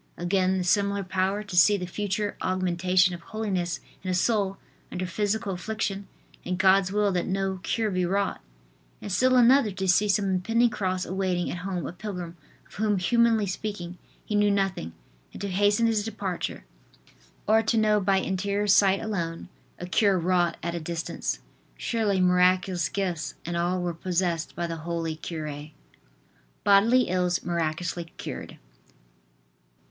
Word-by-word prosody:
Again, 185 +1 +1
the 185 - -1
similar 200 +2 +1
power 190 +2 -1
to 200 -4 -7
see 200 +4 +6
the 180 - -4
future 205 +2 -2
augmentation 185 0 +2
of 170 - -7
holiness 190 -3 -3 0.2
in 185 - -5
a 185 - +1
soul 195 0 +1 0.3
under 185 0 -3
physical 205 +3 -1
affliction 200 +1 -3 0.4
and 180 0 -2
God's 190 0 +4
will 205 0 +2
that 180 -2 -1
no 190 0 -1
cure 220 +2 -1
be 185 -1 0
wrought; 195 +3 -1 0.6
and 205 - -7
still 255 +7 +3
another, 250 -1 +5
to 190 0 -3
see 205 +3 +3
some 200 0 +2
impending 225 +6 +2
cross 185 -3 -2
awaiting 185 -2 -1
at - - -4
home 180 -3 -3
a 165 - -5
pilgrim, 180 -3 -6 0.3
of - - -21
whom 210 -1 0
humanly 225 +3 +3
speaking, 185 -2 -5 0.3
he - - -4
knew 205 0 +3
nothing, 195 - -1 0.4
and - - -9
to 200 - -2
hasten 205 +4 +3
his 220 -2 +1
departure; 200 -4 -4 0.8
or 220 +1 +5
to 225 +1 0
know 215 -1 +3
by 195 0 +2
interior 200 +2 -1
sight 195 -1 +5
alone, 175 -6 -4 0.3
a 180 - -6
cure 195 +1 +3
wrought 175 -1 +1
at 170 +1 -2
a 170 - -3
distance. 165 +1 -4 0.4
Surely 215 -5 0
miraculous 180 -2 +3
gifts 180 -5 -3
and 170 +1 -3
all 175 +2 0
were 175 -1 -2
possessed 170 -1 -2
by 175 - -2
the 165 -1 -4
holy 165 0 -3
cure. 155 -2 -6 0.9
BODILY 225 +5 +5
ILLS 180 0 0
MIRACULOUSLY 170 +1 -2
CURED. - - -7
190 Hz, 155 wpm, -26 LUFS, 175-205 Hz, 0.9 s, see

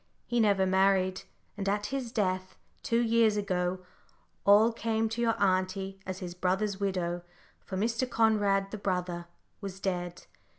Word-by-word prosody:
He 240 - 0
never 200 -3 +4
married, 190 0 +2 0.3
and 200 -1 -2
at 205 +1 0
his 260 -4 -3
death, 185 -4 -1 0.2
two 230 0 +1
years 225 -2 +3
ago, 185 -2 -1 0.7
all 215 +3 +6
came 225 -1 0
to 225 +2 -3
your 230 -1 +1
auntie 190 0 0
as 185 -1 -3
his 180 -2 -6
brother's 190 +3 -1
widow, 180 -3 -1 0.4
for 190 - -6
Mr. 230 +5 0
Conrad, 205 -4 +2
the 215 - -5
brother, 180 -3 -2 0.3
was 195 -1 -6
dead. 180 -2 -3
195 Hz, 145 wpm, -30 LUFS, 185-220 Hz, 0.7 s, all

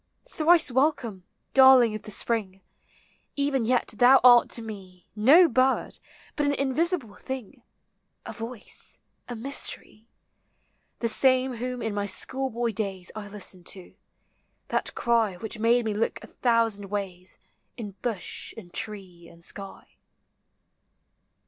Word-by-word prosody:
Thrice 325 -2 +3
welcome, 245 - 0 0.3
darling 260 -4 +7
of 215 - -5
the - - -11
spring! 200 -3 -2 0.7
Even 280 -4 0
yet 245 -1 +1
thou 255 +3 +7
art 245 -1 +7
to 230 - -1
me 190 -5 -10
No 285 +12 +6
bird, 260 0 +1 0.4
but 295 -1 0
an 285 - +1
invisible 275 - 0
thing, 260 -6 -7 0.6
A - - -6
voice, 230 0 -6 0.3
a 240 - -4
mystery; 230 -3 -2 0.9
The 235 - +1
same 255 +2 +3
whom 250 +1 -4
in 220 -2 -2
my 205 0 -2
schoolboy 240 +2 -2
days 195 -4 -4
I 215 -1 -7
listened 195 -3 -6
to; 185 -2 -4 0.8
that - - 0
cry 230 -5 +1
.Which 220 +3 -5
made 235 +1 +3
me 215 - -1
look 210 +2 -1
a - - -10
thousand 230 -4 0
W&JB, 190 -2 -5 0.4
In 215 -4 -6
bush 220 -7 -4
and 175 -6 -12
tree 190 -6 -6
and 170 0 -15
sky. 195 -1 -9
230 Hz, 130 wpm, -26 LUFS, 205-255 Hz, 0.9 s, darling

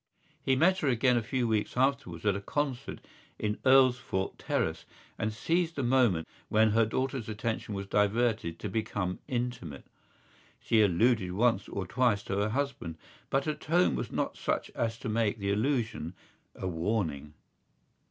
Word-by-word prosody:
He 130 - +2
met 185 +7 +4
her 150 - -1
again 125 0 +3
a 120 - +2
few 120 +2 -1
weeks 110 +1 -1
afterwards 130 -11 0
at 100 -2 +3
a 100 - -3
concert 135 +3 -3 0.4
in 105 0 -1
Earlsfort 125 -7 +3
Terrace - - -1 0.3
and 110 0 0
seized 165 +9 0
the 140 - -1
moments 120 -10 +3 0.2
when 110 0 +4
her 110 +1 +3
daughter's 130 0 -2
attention 110 -1 -3
was 100 0 -4
diverted 105 -3 +1
to 105 - -5
become 100 -3 -2
intimate. 120 - -4 0.7
She 110 - +3
alluded 100 0 +3
once 110 0 +2
or 95 - -3
twice 110 0 +1
to 95 - -3
her 105 +1 +1
husband 120 - -3 0.3
but 135 0 +1
her 155 - 0
tone 165 +4 +2
was - - -3
not - - -2
such - - -2
as 115 -1 -2
to 125 - -7
make 110 -1 +1
the 100 -1 -1
allusion 110 - -1 0.4
a 95 - -4
warning. 80 -5 -2
110 Hz, 160 wpm, -30 LUFS, 100-130 Hz, 0.7 s, met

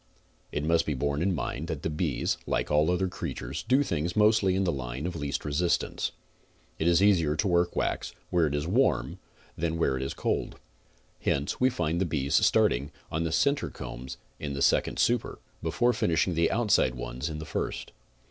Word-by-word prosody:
It 75 - -2
must 85 +1 +2
be 75 - 0
borne 70 +3 -1
in 95 +1 +1
mind 75 +1 -3
that 80 -4 -4
the - - 0
bees, 75 - -1
like - - -1
all 75 +2 +4
other 90 +1 +1
crea 90 - -5
tures, - - -5
do 130 +4 +4
things 85 - -2
mostly 105 -3 +4
in 95 - +1
the 90 - +1
line 65 +1 -4
of 90 -1 -3
least 70 -3 -3
resistance. 80 +4 0 0.7
It 80 - +1
is 85 +2 +4
easier 85 -7 +4
to 100 - 0
work 85 -1 +2
wax - - -1 0.2
where 85 -3 +3
it 70 - -2
is 75 +1 -1
warm 120 +10 +1 0.4
than 85 0 -1
where 70 -5 +1
it - - -4
is 65 - -3
cold. - - -2 0.6
Hence 70 +1 -1
we 130 - +5
find 85 -6 -1
the - - +2
bees 70 -4 -2
starting 70 +4 +3 0.2
on 80 +1 -1
the 80 - -1
center 140 - +2
combs 65 +2 -7 0.2
in 70 -1 -4
the 70 - -1
second - - +2
super, - - +1 0.2
before 120 +1 +2
finishing 90 -3 +1
the 85 0 +2
outside 105 - +2
ones - - -4
in 75 - -5
the 80 - -6
first. - - -4
80 Hz, 195 wpm, -28 LUFS, 70-90 Hz, 0.7 s, we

